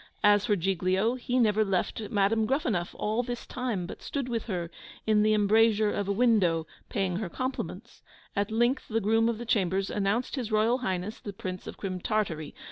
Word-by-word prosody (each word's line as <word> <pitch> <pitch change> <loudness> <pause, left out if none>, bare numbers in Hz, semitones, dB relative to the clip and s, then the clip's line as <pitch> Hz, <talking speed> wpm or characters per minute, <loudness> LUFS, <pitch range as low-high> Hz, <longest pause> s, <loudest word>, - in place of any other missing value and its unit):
As 205 +1 +5
for 210 - +3
Giglio, 190 +4 +1
he 250 0 -2
never 215 -3 +4
left 200 +2 -1
Madam 215 +1 +2
Gruffanuff 230 - -1
all 215 +3 0
this 245 -1 -5
time, 240 -8 -3
but - - -9
stood 275 -3 -3
with 235 -3 -2
her 175 -5 -3 0.3
in 215 -1 +4
the 215 0 +4
embrasure 215 0 +4
of 205 - -2
a - - +1
window, 195 -8 +3 0.2
paying 190 -3 -1
her 200 -3 -3
compliments. 255 +8 -5 0.3
At 200 0 0
length 240 +5 +1
the 225 0 0
groom 225 +2 +3
of 230 - -1
the 240 - -6
chambers 195 -3 +1
announced 210 +7 0
his 240 -4 -3
Royal 220 +4 +3
Highness 190 -2 -3
the 205 - -7
Prince 185 -1 -6
of - - -7
Crim 185 -2 -4
Tartary! 170 -8 -2
215 Hz, 190 wpm, -28 LUFS, 195-230 Hz, 0.3 s, As